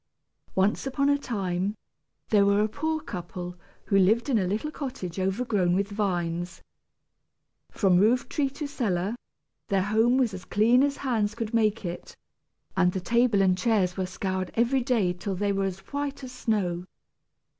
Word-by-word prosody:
Once 195 +7 +1
upon 275 +1 +1
a 285 - +4
time, 195 -5 -2 0.5
there 205 -2 +5
were 200 +1 +3
a 215 - +2
poor 315 +7 -2
couple 180 - -6 0.3
who 195 - +3
lived 220 +8 +3
in 240 -5 +3
a 185 - 0
little 215 +11 -2
cottage 200 - -5
overgrown 190 -2 +1
with 200 +2 0
vines. 175 -4 -2 1.1
From 185 -3 +3
roof 230 +5 +3
tree 280 -2 0
to 295 +3 -6
cellar, 210 -7 -1 0.5
their 195 -3 +1
home 220 +5 +3
was 245 -6 +2
as 185 -1 -7
clean 225 +7 +3
as 280 0 +1
hands 220 -6 0
could 230 -1 -4
make 215 -2 +1
it, 175 0 -6 0.6
and 180 0 +3
the 190 - -1
table 235 0 +3
and 185 -1 +4
chairs 185 -2 +1
were 185 -1 -2
scoured 185 -1 -3
every 240 +3 +2
day 230 -8 +1
till 185 +2 -4
they 200 +2 0
were 195 0 0
as 190 -1 -3
white 285 -1 -3
as 255 - -7
snow. 195 -8 -1
205 Hz, 165 wpm, -27 LUFS, 185-245 Hz, 1.1 s, there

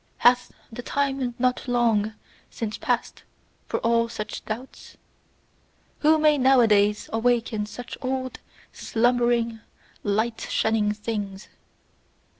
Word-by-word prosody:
Hath 250 +1 +4 0.2
the 230 - -6
time 270 -2 -1
not 250 +1 0
LONG 225 -3 +2 0.3
since 220 -3 -5
passed - - -1 0.5
for - - -1
all 230 0 +2
such 215 -2 -6
doubts? 235 +5 -7 1.0
Who 315 +1 +5
may 305 -1 +4
nowadays 215 -6 +4
awaken 225 -2 +1
such 240 +3 -8
old 260 0 -3 0.3
slumbering, 235 -1 +1 0.4
light 220 +3 -1
shunning 220 -1 +1
things! 210 -2 -5
235 Hz, 100 wpm, -25 LUFS, 215-250 Hz, 1.0 s, Who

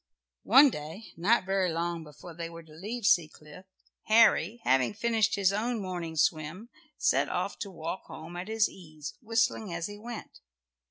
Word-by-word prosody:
One 275 0 +8
day, 160 +8 -8
not 195 +5 +2
very 190 -2 +1
long 170 0 -2
before 150 +3 -12
they 165 0 -6
were 165 0 -10
to 155 -1 -17
leave 210 +8 -5
Seacliff, 165 -3 0 0.4
Harry, 220 -1 +4
having 130 +7 +2
finished 225 -1 +1
his 195 -1 +2
own 230 +3 -1
morning 175 -4 -4
swim, 160 +8 0 0.3
set - - +2
off - - -2
to 200 - -4
walk 170 0 -6
home 165 +2 -9
at 180 +2 -5
his 220 -1 +2
ease, 155 -5 -9
whistling 225 -3 0
as 170 -1 -3
he 205 +2 -7
went. 235 +1 -8
185 Hz, 165 wpm, -29 LUFS, 165-220 Hz, 0.4 s, One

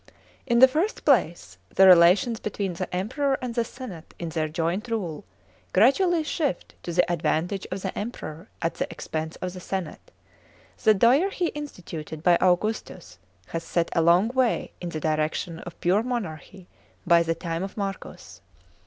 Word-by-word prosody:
(i) - - -21 0.4
In 235 -2 +3
the 260 +2 +9
first 320 +11 -2
place, 170 - +1
the 190 - +5
relations 185 +6 +6
between 200 -3 -3
the 180 +2 -5
Emperor 265 +9 0
and 250 -2 -4
the 235 0 +1
senate 225 -9 -10
in 170 - -5
their 160 -1 -1
joint 170 +7 -2
rule, 195 -10 -3 0.5
gradually 320 - +4
shift 300 - -2
to 175 - -5
the 175 +1 +3
advantage 175 +3 -1
of 185 +1 -5
the 190 - -3
Emperor 185 -6 -6
at 165 - 0
the - - -3
expense 160 -1 -5
of 180 -1 -3
the 185 - -8
senate. 180 -2 -5 0.7
The 215 - +6
dyarchy 320 - +3
insiituted 170 - -7
by 175 0 +5
Augustus 185 +5 -1 0.3
has 165 0 -4
set 170 -1 -1
a 165 - +4
long 175 +6 +4
way 255 -2 0
in 175 - -4
the 155 - -4
direction 155 +2 -1
of 170 -1 -10
pure 185 +4 +2
monarchy 195 - -5 0.4
by 170 -1 +5
the 165 0 0
time 165 0 -4
of 195 +2 -6
Marcus. 195 -2 -6
185 Hz, 165 wpm, -25 LUFS, 165-235 Hz, 0.7 s, the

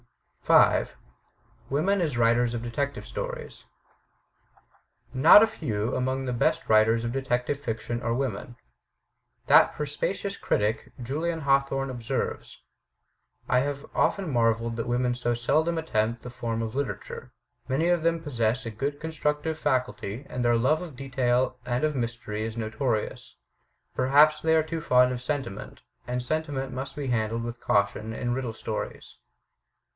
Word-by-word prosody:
5. - - +4 0.7
Women 185 +8 +1
as 150 -8 -1
Writers 120 +1 +3
of 115 - -3
Detective 140 +4 -3
Stories - - -6 1.5
Not 130 +10 +8
a - - +4
few 115 - -3
among 130 +1 -1
the 125 - -2
best 120 - +1
writers 110 +2 +4
of 115 - -2
detective 135 +1 -1
fiction 120 -2 -4
are 115 - -1
women. 120 -2 -3 0.9
That - - +6
perspicacious 185 +7 -3
critic, 105 +2 -1
Julian 160 +7 -2
Hawthorne, 135 -1 +1
observes: 120 -3 -4 0.9
*'I 125 - +3
have 140 +1 -2
often 195 -4 +1
marveled 115 -1 +1
that 115 0 -3
women 125 0 +1
so 120 -1 -1
seldom 155 +8 +1
attempt 115 -7 -1
this 125 0 -9
form 115 -2 -2
of 110 -1 -4
literature; 135 -8 -4 0.4
many 145 +6 +1
of 175 -2 +2
them 165 0 +1
possess 120 -5 -1
a 115 - -4
good 140 +6 -3
con 160 +1 -5
structive 150 +1 -1
faculty, 130 -5 -2
and 125 - -3
their 120 -1 +3
love 135 +7 +2
of 170 -6 -8
detail 130 -1 0
and 125 +3 -1
of 150 -1 -1
mystery 115 -3 -3
is 110 +1 -5
notorious. 110 0 -3 0.6
Perhaps 145 +4 +5
they 160 0 +3
are 160 - +4
too 160 +1 -4
fond 125 -5 +4
of 125 - -5
sentiment; 130 -6 -4 0.3
and 125 0 -2
sentiment 140 -2 -2
must 130 +2 -5
be 145 -2 -3
handled 115 -1 0
with 120 0 -6
caution 100 +2 +1
in 120 +2 -2
riddle 125 -3 -3
stories." - - -6
125 Hz, 150 wpm, -27 LUFS, 115-145 Hz, 1.5 s, Not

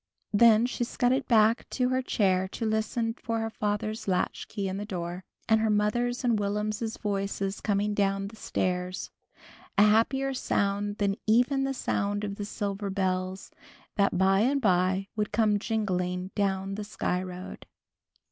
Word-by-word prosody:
Then 225 +1 +6
she 245 0 -2
scudded 250 +3 0
back 225 0 +3
to 250 -1 0
her 255 0 +1
chair 190 -6 +1
to 230 - -3
listen 220 +1 0
for 230 -1 -3
her 225 0 -2
father's 215 +1 -2
latchkey 195 +2 -1
in 190 0 -3
the 205 - -3
door, 180 -2 -5 0.2
and 220 -1 +4
her 220 - +2
mother's 240 +4 +1
and 235 -3 +2
Will'm's 210 +2 -2
voices 200 -1 -2
coming 205 0 0
down 195 -1 0
the 220 - -13
stairs, 180 -3 -2 0.7
a 205 - +7
happier 265 +6 +3
sound 205 -4 -1
than 200 -1 0
even 250 +5 +3
the 270 0 -2
sound 205 -3 -1
of 200 -1 -4
the 205 - -4
silver 200 -1 -3
bells, 185 0 -2 0.4
that 200 -3 +2
by 190 +1 +4
and 265 +6 +2
by 190 -3 +2
would 210 -1 -1
come 210 -1 +2
jingling 185 -4 -2
down 195 -1 -1
the 210 +1 -4
Sky 185 -3 -2
Road. 185 0 -8
205 Hz, 155 wpm, -28 LUFS, 195-225 Hz, 0.7 s, a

